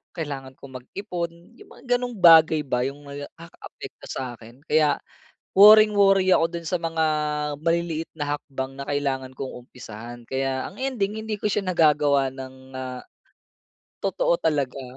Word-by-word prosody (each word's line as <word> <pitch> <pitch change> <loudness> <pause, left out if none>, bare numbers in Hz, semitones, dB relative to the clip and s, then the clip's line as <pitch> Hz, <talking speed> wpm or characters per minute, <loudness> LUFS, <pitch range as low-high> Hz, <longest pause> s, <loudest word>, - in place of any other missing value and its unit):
Kailangan 135 -5 -6
kong 130 -2 -10
mag-ipon. 175 - -5 0.3
Yung - - -15
mga - - -16 0.2
ganong 245 -1 -5
bagay 160 -3 +6
ba, 125 -2 -1
yung 140 +3 -4
nakakaapekto 145 +4 -11
sa 130 -2 -4
akin, 120 +5 -16
kaya 150 -2 +3 0.5
worring-worry 200 -2 +6
ako 165 - +4
doon 170 - -5
sa 175 +2 -2
mga 165 -1 -1 0.6
maliliit 165 0 -1
na 145 -1 -2
hakbang 135 -2 -6
na 140 - -6
kailangan 135 -2 -2
kong 135 - -5 0.2
umpisahan. 120 0 -10
Kaya 130 +1 -2
ang - - -15
ending 220 -6 -2
hindi 220 -1 -4
ko 210 +1 -2
siya 195 -1 -1
nagagawa 150 -5 +3
ng, 130 0 -11
ah, 130 -1 -6 1.0
totoo - - +1
talaga. 140 -3 -1
145 Hz, 145 wpm, -24 LUFS, 130-180 Hz, 1.0 s, bagay